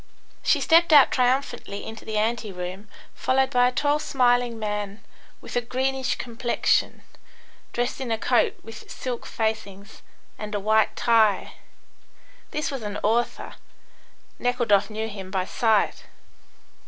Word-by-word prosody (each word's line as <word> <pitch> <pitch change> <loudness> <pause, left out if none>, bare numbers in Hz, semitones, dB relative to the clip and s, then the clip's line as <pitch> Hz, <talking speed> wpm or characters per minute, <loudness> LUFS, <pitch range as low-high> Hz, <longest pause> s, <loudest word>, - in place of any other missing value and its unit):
She - - +3
stepped 335 +1 +5
out 290 -3 +8
triumphantly 250 -5 0
into 220 - -9
the 215 -1 -3
ante 220 0 -1
room, 185 +3 -7 0.3
followed 265 +1 +1
by 245 -2 +4
a - - 0
tall, 290 +3 +1
smiling 245 -4 +1
man, 210 -1 -4 0.4
with - - -9
a 245 - +2
greenish 265 +2 -1
complexion, 240 0 0 0.7
dressed 245 +2 -2
in 255 - -4
a 225 - +1
coat 245 +2 +2
with 225 -1 -11
silk 250 -2 -5
facings, 215 -2 -4 0.4
and 210 0 -5
a - - 0
white 215 +2 +2
tie. 220 -5 +2 1.0
This 300 -1 -2
was 270 -3 -5
an 205 -1 -4
author. 235 +3 -1 0.8
Nekhludoff 235 -5 +2
knew 220 +1 -3
him 195 -3 -8
by 190 -1 -1
sight. 220 0 +1
230 Hz, 135 wpm, -24 LUFS, 210-250 Hz, 1.0 s, out